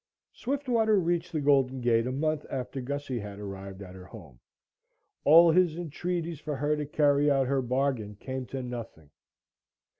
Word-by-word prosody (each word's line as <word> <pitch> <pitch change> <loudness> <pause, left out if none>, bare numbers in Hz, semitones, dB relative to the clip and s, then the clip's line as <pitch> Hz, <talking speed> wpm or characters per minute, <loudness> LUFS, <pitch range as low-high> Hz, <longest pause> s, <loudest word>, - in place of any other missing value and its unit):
Swiftwater 240 -6 +1
reached 175 0 -1
the 155 - -1
Golden 135 -2 +2
Gate 120 -1 +2
a - - -2
month 155 +3 -1
after 130 0 -4
Gussie 135 -1 -4
had 100 -1 -8
arrived 100 -1 -8
at 90 -1 -11
her 95 -1 -11
home. 80 - -13 0.9
All 165 +3 +8
his 170 -1 +3
entreaties 170 -1 -3
for 150 - -4
her 145 +3 0
to 150 -1 -4
carry 145 -1 +3
out 135 -2 +3
her 135 +1 +1
bargain 125 -4 -1
came 130 +3 -6
to 135 -1 -5
nothing. 115 -12 -8
135 Hz, 160 wpm, -28 LUFS, 120-155 Hz, 0.9 s, All